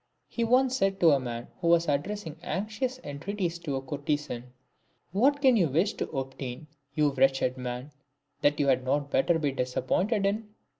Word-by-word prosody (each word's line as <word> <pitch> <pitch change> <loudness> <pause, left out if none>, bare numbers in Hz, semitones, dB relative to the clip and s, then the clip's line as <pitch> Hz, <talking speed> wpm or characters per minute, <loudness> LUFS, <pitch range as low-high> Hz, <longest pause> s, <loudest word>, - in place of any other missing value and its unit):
He 235 - -2
once 255 +2 +3
said 195 -4 +1
to 165 -2 +7
a 140 - +4
man 120 -2 -5
who 170 - -1
was 170 0 +4
addressing 160 +3 -2
anxious 215 - -3
en 140 -1 -6
treaties 180 -1 -2
to 150 -5 -3
a 135 - -3
courtesan, 145 -3 -3 0.3
" - - -43
What 275 - +2
can 260 -2 +6
you 185 -7 +4
wish 165 +9 +2
to - - -4
obtain, 135 0 -5 0.3
you 150 -2 +3
wretched 135 -1 +2
man, 125 +2 -5 0.5
that 145 +1 +3
you 145 - +3
had 130 -1 +3
not 140 +2 0
better 165 +5 +3
be 150 -3 0
disappointed 135 - 0
in 210 +1 -2
155 Hz, 185 wpm, -28 LUFS, 135-200 Hz, 0.5 s, to